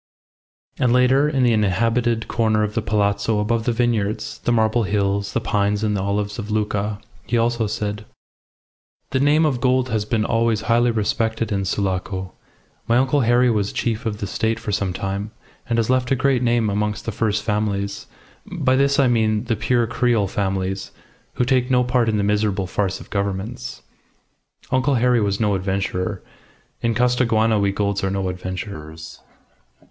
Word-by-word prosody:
And 125 - +3
later, 130 +4 +4
in 135 -3 +1
the 120 -2 +4
inhabited 115 +3 +1
corner 110 -2 +1
of 105 0 -2
the 115 - 0
Palazzo 105 0 0
above 110 +2 0
the 120 - +2
vineyards, 110 -3 -1
the - - +1
marble 110 0 +2
hills, 100 -1 -1
the - - +1
pines 105 0 0
and 105 -1 +1
olives 100 +2 -2
of 105 -1 -6
Lucca, 105 -1 -1 0.3
he 120 - +1
also 115 -1 +1
said 105 0 -4 1.1
"The 130 - +1
name 150 +3 +4
of 130 -5 0
Gould 130 0 +2
has 110 -2 -1
been 110 0 0
always 115 -2 +1
highly 120 +2 +2
respected 110 0 -1
in 100 -1 0
Sulaco. 95 -1 -2 0.5
My 115 - +3
uncle 135 +3 +2
Harry 120 +1 +3
was 105 -2 0
chief 115 +1 -2
of 105 -2 -2
the 105 - -4
State 110 +3 -1
for 115 -2 -4
some 100 -1 0
time, 100 +3 -3 0.4
and 115 - +1
has 115 -2 +1
left 130 -1 +1
a 135 - +3
great 130 -1 +1
name 120 -3 +2
amongst 105 +1 -2
the 115 - -2
first 105 -1 -1
families. 105 -2 -2 0.4
By 130 - +1
this 140 +1 +2
I 135 - +5
mean 110 -3 +1
the 120 -2 -1
pure 120 +2 +1
Creole 115 -2 +1
families, 95 -1 -2 0.5
who 125 - +1
take 125 0 +1
no 125 -1 +3
part 125 -2 +1
in 110 - +1
the 100 - 0
miserable 105 -1 +1
farce 95 +1 -2
of - - -14
governments. 100 - -4 0.9
Uncle 130 +2 +2
Harry 125 -1 +3
was 100 -1 0
no 105 -2 +2
adventurer. 95 0 -2 0.6
In 115 -1 0
Costaguana 115 -3 +2
we 100 0 +2
Goulds 100 0 -1
are 95 - +1
no 95 -1 -1
adventurers. 90 -3 -7
110 Hz, 175 wpm, -21 LUFS, 100-120 Hz, 1.1 s, I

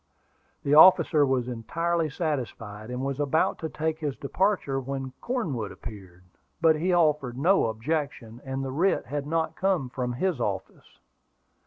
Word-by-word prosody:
The 140 - +1
officer 155 -2 +7
was 130 -2 0
entirely 165 +8 -1
satisfied, 120 - -4
and 125 +2 -3
was 140 0 -3
about 145 +2 +1
to 160 - -4
take 160 +1 -2
his 145 -4 -3
departure 165 -3 0
when 135 0 -5
Cornwood 155 - -2
appeared; 95 -4 -11 0.4
but 165 -2 +5
he 175 +4 0
offered 150 -8 +2
no 180 +1 +3
objection, 120 -1 -3
and 135 0 -4
the 135 - -4
writ 175 +8 +1
had 145 +2 -4
not 160 +1 -1
come 185 -9 0
from 125 -1 -3
his 175 +3 -1
office. 95 -4 -5
140 Hz, 150 wpm, -27 LUFS, 125-160 Hz, 0.4 s, officer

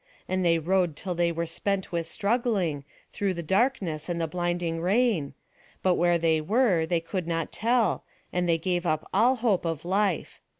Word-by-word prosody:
And 185 0 0
they 165 -1 +4
rowed 175 0 +1
till 180 +3 -4
they 170 0 +1
were 170 0 -2
spent 190 +3 -2
with 170 -1 -2
struggling, 200 - 0 0.3
through 195 -2 -1
the 170 - -4
darkness 190 - 0
and 170 -1 -1
the 165 - 0
blinding 175 0 -2
rain, 185 - +1 0.5
but 185 - +4
where 175 0 +3
they 160 -1 +2
were 195 -3 +2
they 170 0 +1
could 170 +1 -4
not 165 -1 -2
tell, 235 0 +1 0.3
and 180 -1 0
they 165 - +4
gave 175 +1 -1
up 155 -1 -1
all 250 +3 +4
hope 225 -6 +1
of 165 -2 -3
life. 195 -1 0
175 Hz, 180 wpm, -27 LUFS, 165-200 Hz, 0.5 s, they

